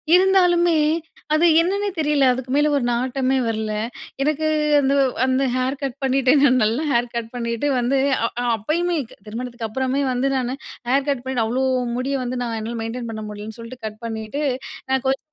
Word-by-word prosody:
இருந்தாலுமே, 355 -3 +4 0.6
அது 310 +2 +4 0.2
என்னன்னே 400 +4 0
தெரில. 300 -3 +2
அதுக்கு 255 0 -6
மேல 295 +1 +3
ஒரு 280 - +1
நாட்டமே 255 +2 0
வரல! 220 -1 -2 0.5
எனக்கு 305 +2 +1 0.3
அந்த 275 -1 +2 0.3
அந்த 260 +1 +1
ஹேர் 255 +2 0
கட் 270 -2 -3
பண்ணிட்டு, 265 -1 +3 0.3
நல்ல 220 +2 +1
ஹேர் 240 -1 +1
கட் 230 -1 -3
பண்ணிட்டு 235 +2 -2
வந்து 245 +3 +1 0.3
அ - - +3 0.3
அப்பயுமே, 335 +11 -1 0.3
திருமணத்துக்கு 235 +1 -5
அப்புறமே 260 +4 -1
வந்து 255 +2 0
நானு, 255 0 -1 0.3
ஹேர் 270 +2 +2
கட் 275 -3 0
பண்ணிட்டு 260 -3 -1
அவ்ளோ 250 +4 0 0.3
முடிய 265 +2 -1
வந்து 250 0 -3
நான் 230 -2 -3
என்னால 230 +2 -4
மெயின்டெயின் 230 +1 -4
பண்ண 220 -1 -6
முடியலன்னு 210 +2 -8
சொல்ட்டு 235 +2 -9
கட் 215 0 -6
பண்ணிட்டு. 225 +5 -4 0.5
நான் 265 -1 +1
கொஞ்சம் 270 +3 -1
255 Hz, 165 wpm, -22 LUFS, 235-280 Hz, 0.6 s, இருந்தாலுமே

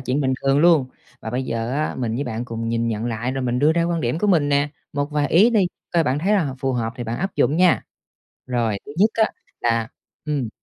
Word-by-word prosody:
chuyện 135 +2 -1
bình 130 -2 +1
thường 135 +1 +3
luôn. 160 -4 +5 0.3
Và 110 - -6
bây 125 +2 -1
giờ 115 -1 -3
á, 150 +2 -1
mình 115 -3 -1
với 140 +5 -2
bạn 115 0 -4
cùng 115 -1 -4
nhìn 115 0 0
nhận 110 +1 -2
lại, 120 +2 -2
rồi 135 0 -3
mình 125 0 0
đưa 150 +4 +4
ra 170 0 +1
quan 170 -1 -1
điểm 125 +5 -1
của 210 - 0
mình 160 -7 +3
nè. 145 +1 +2 0.2
Một 145 +1 -2
vài 150 -1 0
ý 200 - +5
đi, 205 -6 +3 0.3
coi 170 - +4
bạn 130 +2 0
thấy 190 +7 +1
là 200 -5 +3
h 140 - -2
phù 135 -1 0
hợp 115 -2 -2
thì 120 - -5
bạn 115 +1 -3
áp 190 +1 -3
dụng 150 - +2
nha. 180 -1 +4 0.6
Rồi, 120 -5 0
thứ 145 - -8
nhất 210 - +6
á 220 - +4 0.4
là 115 -1 +1 0.4
ừm. 145 -6 -1
135 Hz, 260 wpm, -22 LUFS, 120-160 Hz, 0.6 s, nhất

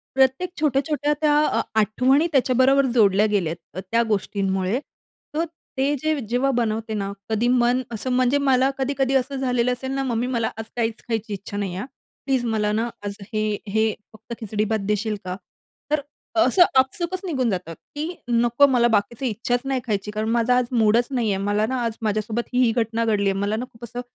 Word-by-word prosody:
प्रत्येक 265 +7 +3
छोट्या-छोट्या 295 0 +1
त्या 295 -1 +4
अ, - - +1 0.2
आठवणी 260 - +3
त्याच्याबरोबर 265 0 +4
जोडल्या 205 -1 +5
गेल्या 170 -5 +1
आहेत. 180 +2 -10
त्या 230 0 +3
गोष्टींमुळे 195 +1 0 0.6
तर 330 +2 +1 0.3
ते 280 +2 +2
जे 310 -2 0
जेव्हा 250 +3 +1
बनवते 225 -2 -1
ना 200 -1 -2 0.2
कधी 220 +2 +1
मन 245 0 +3
असं 230 +3 -4
म्हणजे 255 +2 +3
मला 265 -1 +3
कधी-कधी 270 0 0
असं 265 +1 +1
झालेलं 250 -2 +1
असेल 265 +2 -5
ना, 270 0 -1
"मम्मी 245 -1 -1
मला 235 -3 0
आज 225 - -4
काहीच 225 -2 -1
खायची 225 -2 -2
इच्छा 200 +1 -6
नाही 195 -3 -2
आहे 190 - -3
हं. - - -5 0.4
प्लीज 265 -3 +1
मला 215 -2 0
ना 225 +3 0 0.2
आज 200 - -3 0.2
हे 215 0 0 0.2
हे 220 +1 +1 0.2
फक्त 220 +2 -10
खिचडी 215 -1 -2
भात 220 - +1
देशील 210 +1 0
का?" 180 - -3 0.6
तर 300 - +2 0.4
असं 360 - +6 0.2
आपसूकच 345 +8 -1
निघून 260 -9 0
जातं, 180 -4 -3 0.2
की 315 +4 -3
"नको, 240 +3 +4
मला 240 -1 +4
बाकीच 220 +3 0
इच्छाच 240 +3 -1
नाही 270 -2 -1
खायची, 205 -1 -2
कारण 215 +1 -2
माझा 235 +2 +3
आज 250 - +2
मूडच 230 0 +3
नाही 235 -5 0
आहे. 195 0 -1
मला 205 +1 +1
ना 255 +3 -2
आज 225 -1 -3
माझ्यासोबत 215 +2 -1
ही-ही 250 -2 +4
घटना 230 0 0
घडली 200 -3 +2
आहे." 195 - -1
मला 205 +2 0
ना 245 +3 -3
खूप 225 +1 -18
असं 240 +2 -5
235 Hz, 190 wpm, -23 LUFS, 215-265 Hz, 0.6 s, असं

